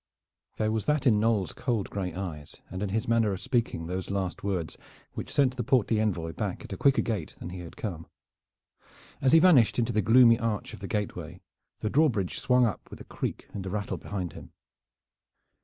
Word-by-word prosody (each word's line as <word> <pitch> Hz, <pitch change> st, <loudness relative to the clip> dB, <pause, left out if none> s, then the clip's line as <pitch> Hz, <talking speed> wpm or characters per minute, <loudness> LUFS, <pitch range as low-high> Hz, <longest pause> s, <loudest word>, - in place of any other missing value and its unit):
There 110 Hz, 0 st, +1 dB
was 110 Hz, -1 st, -2 dB
that 150 Hz, -2 st, +1 dB
in 110 Hz, -5 st, +5 dB
Knolles' 110 Hz, -4 st, +1 dB
cold 115 Hz, -6 st, -2 dB
gray 95 Hz, -3 st, -2 dB
eyes 85 Hz, -6 st, -6 dB, 0.2 s
and 95 Hz, +1 st, -5 dB
in 105 Hz, -, -1 dB
his 110 Hz, +5 st, -1 dB
manner 115 Hz, -3 st, +2 dB
of 95 Hz, -, -5 dB
speaking 105 Hz, -5 st, -1 dB
those 90 Hz, +2 st, -4 dB
last 95 Hz, -2 st, -3 dB
words 95 Hz, -5 st, -2 dB, 0.4 s
which -, -, -6 dB
sent 130 Hz, -3 st, +2 dB
the 120 Hz, -, -1 dB
portly 115 Hz, -3 st, +2 dB
envoy 90 Hz, -7 st, -1 dB
back -, -, -4 dB
at -, -, -7 dB
a -, -, -5 dB
quicker 140 Hz, -1 st, +3 dB
gait 105 Hz, -9 st, -3 dB
than 90 Hz, -, -7 dB
he 90 Hz, -, -7 dB
had 85 Hz, -2 st, -10 dB
come. 85 Hz, -7 st, -5 dB, 1.1 s
As 130 Hz, -, +3 dB
he 165 Hz, -, +8 dB
vanished 160 Hz, -10 st, +5 dB
into 120 Hz, 0 st, +1 dB
the 110 Hz, -, +2 dB
gloomy 115 Hz, +2 st, +6 dB
arch 110 Hz, -3 st, -2 dB
of -, -, -9 dB
the 100 Hz, -, -6 dB
gateway 90 Hz, -5 st, -4 dB, 0.4 s
the 110 Hz, -, -1 dB
drawbridge 125 Hz, -, +2 dB
swung 125 Hz, -1 st, +4 dB
up 110 Hz, -, -3 dB
with -, -, -11 dB
creak -, -, -4 dB
and 95 Hz, -2 st, -5 dB
rattle 105 Hz, 0 st, -2 dB
behind 95 Hz, -4 st, -5 dB
him. -, -, -12 dB
105 Hz, 195 wpm, -28 LUFS, 95-120 Hz, 1.1 s, he